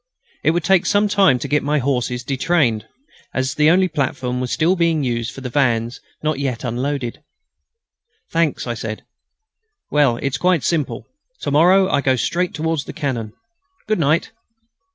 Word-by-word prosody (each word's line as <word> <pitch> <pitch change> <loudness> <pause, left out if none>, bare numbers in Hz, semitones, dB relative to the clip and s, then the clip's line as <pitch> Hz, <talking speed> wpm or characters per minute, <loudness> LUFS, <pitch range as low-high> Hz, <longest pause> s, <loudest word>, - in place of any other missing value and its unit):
It - - +3
would 170 +1 +1
take 190 -2 +3
some 205 +1 +3
time 195 -9 +4
to 140 - -5
get 145 +2 +1
my 150 +2 0
horses 125 -2 -1
detrained, 135 -5 0 0.5
as 130 +1 0
the 150 +1 +4
only 185 +2 +4
platform 130 -5 -2
was 125 - -3
still 165 +4 +2
being 165 -4 +1
used 115 -3 -2
for 135 - -10
the 130 - -5
vans 120 -2 0 0.2
not 155 -2 0
yet 130 -4 -2
unloaded. 125 +1 -3 1.1
"Thanks," 165 -3 +1
said 115 -2 -4
I. - - -38 0.9
"Well, 140 -5 +3
it's 135 +2 -2
quite 180 -5 +2
simple. 160 -5 -1 0.4
To - - -2
morrow 180 +6 +5
I 140 - +1
go 130 -1 +2
straight 175 +9 -1
towards 160 -1 -1
the - - -8
cannon. 115 -7 -3 0.5
Good 215 -2 +1
night." 155 +2 +1
140 Hz, 165 wpm, -20 LUFS, 125-165 Hz, 1.1 s, morrow